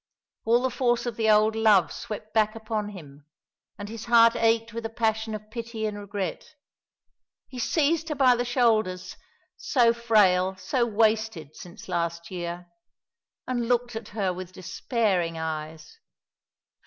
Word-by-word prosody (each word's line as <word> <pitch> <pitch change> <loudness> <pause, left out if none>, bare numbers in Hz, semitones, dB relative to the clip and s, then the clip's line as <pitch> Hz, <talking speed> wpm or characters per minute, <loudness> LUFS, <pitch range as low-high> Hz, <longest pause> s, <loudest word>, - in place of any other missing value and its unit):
All 235 +2 +3
the 260 - 0
force 240 -1 0
of 240 -2 -3
the 220 -1 +1
old 215 +1 +4
love 210 -7 +4
swept 215 0 -7
back 215 -1 +2
upon 220 -2 -3
him; 150 -7 -12 0.5
and 205 - -7
his 225 +1 -8
heart 230 -1 +6
ached 225 0 +1
with 230 0 -5
a - - -15
passion 220 -1 -1
of 215 0 -10
pity 230 -1 -5
and 210 -1 -3
regret. 205 +7 -5 0.9
He 255 - -9
seized 320 +5 +1
her 300 - -2
by 260 -3 +5
the 240 - -1
shoulders 225 -7 +1 0.4
so 240 -4 +3
frail, 195 -5 +3
so 235 +7 -1
wasted, 220 -8 0
since 175 -1 -12
last 170 -1 -3
year 175 -1 -5 0.8
and 240 -2 -1
looked 245 -1 0
at 225 -1 -6
her 195 -4 -2
with 185 0 -8
despairing 185 -3 -1
eyes. 155 -1 -6
220 Hz, 150 wpm, -26 LUFS, 185-235 Hz, 0.9 s, heart